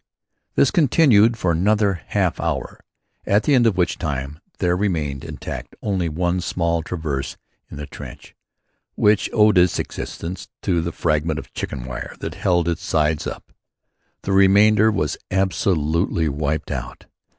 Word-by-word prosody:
This -, -, +4 dB
continued 125 Hz, -, +4 dB
for 90 Hz, -, 0 dB
another 100 Hz, +1 st, +1 dB
half -, -, 0 dB
hour, -, -, -3 dB, 0.5 s
at 105 Hz, +2 st, +3 dB
the 145 Hz, -, +2 dB
end 120 Hz, -3 st, +5 dB
of 100 Hz, -5 st, +1 dB
which 90 Hz, -, 0 dB
time 75 Hz, -2 st, -4 dB, 0.2 s
there 90 Hz, 0 st, +1 dB
remained 80 Hz, -8 st, -1 dB
intact -, -, -7 dB
only 95 Hz, -5 st, 0 dB
one 90 Hz, +3 st, -1 dB
small 85 Hz, -1 st, -1 dB
traverse 75 Hz, -6 st, -4 dB, 0.3 s
in -, -, -9 dB
the 75 Hz, -, -5 dB
trench, -, -, -11 dB, 0.6 s
which 105 Hz, 0 st, +3 dB
owed 105 Hz, -4 st, +5 dB
its 90 Hz, -1 st, +3 dB
existence 90 Hz, +2 st, -5 dB, 0.2 s
to 85 Hz, -3 st, +1 dB
the 85 Hz, +1 st, -3 dB
fragment 75 Hz, -1 st, 0 dB
of -, -, -9 dB
chicken 65 Hz, -3 st, -5 dB
wire 65 Hz, 0 st, -6 dB
that -, -, -5 dB
held 85 Hz, -2 st, +1 dB
its 85 Hz, -2 st, -2 dB
sides 75 Hz, -1 st, 0 dB
up. -, -, -8 dB, 0.7 s
The 95 Hz, -, -2 dB
remainder 100 Hz, +3 st, +5 dB
was 75 Hz, -9 st, -1 dB
absolutely 85 Hz, -3 st, +1 dB
wiped 75 Hz, +2 st, -2 dB
out. 60 Hz, -2 st, -6 dB
85 Hz, 150 wpm, -21 LUFS, 75-100 Hz, 0.7 s, end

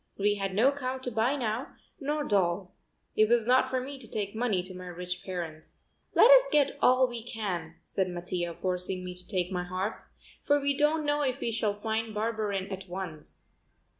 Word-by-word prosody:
We 205 Hz, +1 st, +3 dB
had 195 Hz, -1 st, -2 dB
no 245 Hz, +7 st, +5 dB
cow 265 Hz, -2 st, -3 dB
to 255 Hz, -1 st, -5 dB
buy 225 Hz, +5 st, +2 dB
now, 240 Hz, 0 st, -3 dB, 0.2 s
nor 295 Hz, +1 st, -1 dB
doll. 185 Hz, -4 st, +1 dB, 0.4 s
It 215 Hz, 0 st, +4 dB
was 235 Hz, -2 st, +3 dB
not 255 Hz, +2 st, +4 dB
for 260 Hz, -, 0 dB
me 270 Hz, +2 st, -6 dB
to 230 Hz, -4 st, -10 dB
take 200 Hz, -2 st, -3 dB
money 220 Hz, -5 st, 0 dB
to 185 Hz, +1 st, -9 dB
my 180 Hz, 0 st, -8 dB
rich 180 Hz, +1 st, -5 dB
parents. 170 Hz, -4 st, -6 dB, 0.3 s
"Let 485 Hz, -, +8 dB
us -, -, +8 dB
get 290 Hz, -2 st, +3 dB
all 255 Hz, +1 st, +5 dB
we 240 Hz, -1 st, -5 dB
can," 185 Hz, -9 st, -4 dB
said 190 Hz, -1 st, -1 dB
Mattia, 175 Hz, -1 st, -3 dB
forcing 185 Hz, 0 st, -2 dB
me 180 Hz, -, -5 dB
to 180 Hz, 0 st, -16 dB
take 185 Hz, -3 st, -1 dB
my 180 Hz, -1 st, -1 dB
harp, 185 Hz, +4 st, -3 dB, 0.4 s
"for 290 Hz, 0 st, +3 dB
we 280 Hz, 0 st, +1 dB
don't 300 Hz, +2 st, +2 dB
know 295 Hz, 0 st, +1 dB
if 270 Hz, -1 st, 0 dB
we 235 Hz, -, -1 dB
shall 210 Hz, -2 st, -1 dB
find 220 Hz, 0 st, -2 dB
Barberin 210 Hz, -3 st, -1 dB
at 190 Hz, -1 st, -6 dB
once. 175 Hz, -4 st, -7 dB
210 Hz, 195 wpm, -29 LUFS, 185-255 Hz, 0.4 s, Let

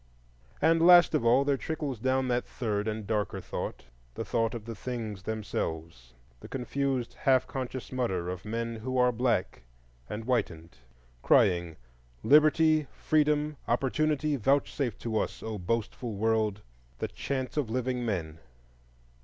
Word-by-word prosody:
And 165 Hz, 0 st, +4 dB
last 175 Hz, 0 st, +7 dB
of 155 Hz, -, +1 dB
all 125 Hz, +4 st, +4 dB
there 140 Hz, -1 st, +2 dB
trickles 150 Hz, -5 st, -4 dB
down 130 Hz, +2 st, +1 dB
that 125 Hz, 0 st, 0 dB
third 105 Hz, -4 st, -2 dB
and 110 Hz, -1 st, -3 dB
darker 105 Hz, -2 st, -1 dB
thought,—the -, -, -7 dB
thought 115 Hz, 0 st, 0 dB
of 110 Hz, -2 st, -7 dB
the 115 Hz, -, -5 dB
things 110 Hz, -3 st, -5 dB
themselves, 80 Hz, -, -5 dB, 0.2 s
the -, -, -11 dB
confused, 135 Hz, -1 st, -2 dB
half 130 Hz, -2 st, +3 dB
conscious 130 Hz, -1 st, -5 dB
mutter 95 Hz, -9 st, -1 dB
of 90 Hz, +1 st, -5 dB
men 115 Hz, +2 st, -3 dB
who 130 Hz, +4 st, -3 dB
are 125 Hz, 0 st, +4 dB
black 120 Hz, -, 0 dB, 0.5 s
and 110 Hz, +2 st, -4 dB
whitened, 85 Hz, -, -2 dB, 0.5 s
crying 85 Hz, -3 st, +3 dB, 0.5 s
"Liberty, 155 Hz, +1 st, +5 dB
Freedom, 150 Hz, -1 st, +1 dB
Opportunity—vouchsafe 140 Hz, -1 st, +1 dB
to 110 Hz, -2 st, -2 dB
us, -, -, -4 dB
O 110 Hz, -2 st, -4 dB
boastful 115 Hz, +3 st, -2 dB
World, 110 Hz, -1 st, 0 dB, 0.3 s
the -, -, -2 dB
chance 130 Hz, -3 st, -4 dB
of 145 Hz, -7 st, -1 dB
living 125 Hz, +1 st, -1 dB
men!" 80 Hz, -8 st, -3 dB
120 Hz, 135 wpm, -29 LUFS, 105-135 Hz, 0.5 s, last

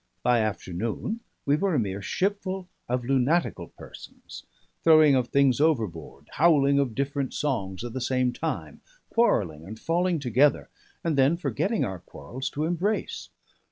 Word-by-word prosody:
By 125 Hz, -1 st, +3 dB
afternoon 110 Hz, -, -3 dB, 0.3 s
we 145 Hz, +1 st, +3 dB
were 190 Hz, 0 st, 0 dB
a -, -, +3 dB
mere 100 Hz, -2 st, -3 dB
shipful 190 Hz, -, -2 dB, 0.2 s
of 125 Hz, 0 st, -1 dB
lunatical 135 Hz, +6 st, +1 dB
persons, -, -, -12 dB, 0.4 s
throwing 155 Hz, -3 st, +7 dB
of 130 Hz, -2 st, +2 dB
things 140 Hz, -1 st, +3 dB
overboard, 100 Hz, -, -1 dB
howling 140 Hz, -3 st, +4 dB
of 130 Hz, -6 st, -1 dB
different 140 Hz, -1 st, -2 dB
songs 110 Hz, -9 st, -2 dB
at 120 Hz, -1 st, -6 dB
the 130 Hz, -, -4 dB
same 125 Hz, 0 st, +1 dB
time, -, -, -4 dB, 0.3 s
quarrelling 95 Hz, -, +1 dB
and 110 Hz, +6 st, -9 dB
falling 175 Hz, +3 st, +1 dB
together, 135 Hz, +1 st, +2 dB, 0.3 s
and 160 Hz, -4 st, 0 dB
then 140 Hz, +6 st, +4 dB
forgetting 210 Hz, +5 st, -1 dB
our 95 Hz, -2 st, -5 dB
quarrels 120 Hz, -, -7 dB
to 150 Hz, +2 st, -2 dB
embrace. 175 Hz, +6 st, -2 dB
135 Hz, 145 wpm, -26 LUFS, 115-165 Hz, 0.4 s, throwing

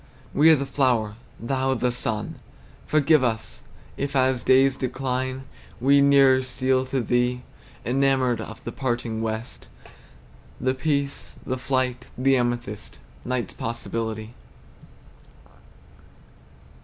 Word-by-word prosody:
We 155 Hz, +3 st, +6 dB
are 160 Hz, -, +8 dB
the 140 Hz, -1 st, -2 dB
flower, 120 Hz, -7 st, +1 dB, 0.2 s
Thou 130 Hz, +2 st, 0 dB
the 125 Hz, 0 st, 0 dB
sun! 110 Hz, -3 st, -3 dB, 0.5 s
Forgive 155 Hz, -1 st, +4 dB
us, 115 Hz, -3 st, -2 dB, 0.4 s
if 140 Hz, 0 st, -3 dB
as 130 Hz, -3 st, +2 dB
days 135 Hz, +1 st, +5 dB
decline, 130 Hz, 0 st, -2 dB, 0.4 s
We 140 Hz, +3 st, +5 dB
nearer 135 Hz, -2 st, +6 dB
steal 130 Hz, 0 st, 0 dB
to 130 Hz, 0 st, -1 dB
Thee, 125 Hz, +1 st, 0 dB, 0.4 s
Enamoured 130 Hz, -2 st, +2 dB
of 110 Hz, 0 st, -9 dB
the 120 Hz, -, -5 dB
parting 120 Hz, -3 st, -2 dB
west, 110 Hz, +2 st, -5 dB, 0.9 s
The 130 Hz, 0 st, +1 dB
peace, 140 Hz, +1 st, -2 dB
the 130 Hz, 0 st, -2 dB
flight, 130 Hz, -1 st, -1 dB
the 135 Hz, +2 st, +3 dB
amethyst, 120 Hz, -4 st, -2 dB, 0.3 s
Night's 125 Hz, -1 st, -2 dB
possibility! 115 Hz, -1 st, -4 dB
130 Hz, 110 wpm, -24 LUFS, 120-135 Hz, 0.9 s, are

